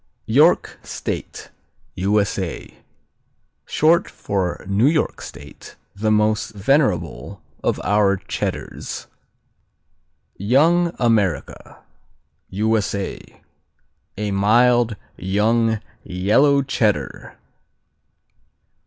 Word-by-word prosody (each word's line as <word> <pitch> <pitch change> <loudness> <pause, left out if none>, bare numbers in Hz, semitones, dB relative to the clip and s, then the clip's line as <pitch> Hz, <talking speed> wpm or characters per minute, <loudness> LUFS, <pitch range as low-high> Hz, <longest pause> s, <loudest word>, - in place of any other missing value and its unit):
York - - +3
State - - -6 0.4
U.S.A. 100 -2 -1 0.9
Short 165 +3 +3
for 95 -3 -3
New 100 +6 +3
York 155 0 0
State, 70 +2 -11 0.2
the 110 +2 -1
most 110 0 +1
venerable 100 - 0 0.2
of - - 0
our 100 0 +2
Cheddars. - - -5 1.3
Young 165 - +3
America 110 -8 -1 0.7
U.S.A. 100 -1 -2 0.7
A 105 0 -2
mild, 115 +3 +3 0.2
young, 110 +4 +1 0.2
yellow 135 +11 +2
Cheddar. 115 -6 -1
105 Hz, 70 wpm, -21 LUFS, 100-120 Hz, 1.3 s, York